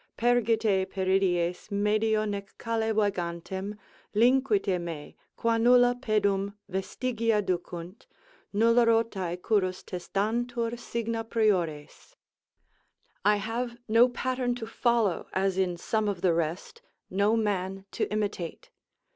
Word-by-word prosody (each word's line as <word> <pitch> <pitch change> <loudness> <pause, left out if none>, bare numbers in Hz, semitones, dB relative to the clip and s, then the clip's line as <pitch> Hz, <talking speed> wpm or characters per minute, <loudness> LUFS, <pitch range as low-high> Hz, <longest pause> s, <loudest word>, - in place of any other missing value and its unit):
Pergite 225 -5 +2
Pieridies, 185 -2 0
medio 215 +1 +1
nec 200 -1 -5
calle 225 -1 -1
vagantem 190 -1 -2 0.4
Linquite 220 -6 +3
me, 165 -4 -7 0.2
qua 230 0 +1
nulla 245 +1 +6
pedum 205 -4 0
vestigia 225 +3 -1
ducunt, 180 0 -4 0.4
Nulla 230 +3 +4
rotae 200 -6 +1
currus 185 -2 0
testantur 230 +6 -2
signa 230 -1 -3
priores. 185 -10 -1 1.1
I 210 +2 +5
have 235 +4 -3
no 230 +3 +5
pattern 250 0 -1
to 235 -2 -5
follow 225 -4 +1
as 190 0 +1
in 180 -2 0
some 215 +4 -1
of 195 -4 -2
the 180 -3 +3
rest, 170 - -3 0.3
no 200 +4 +2
man 195 -3 -1
to - - -2
imitate. 205 -5 -3
210 Hz, 110 wpm, -28 LUFS, 190-230 Hz, 1.1 s, nulla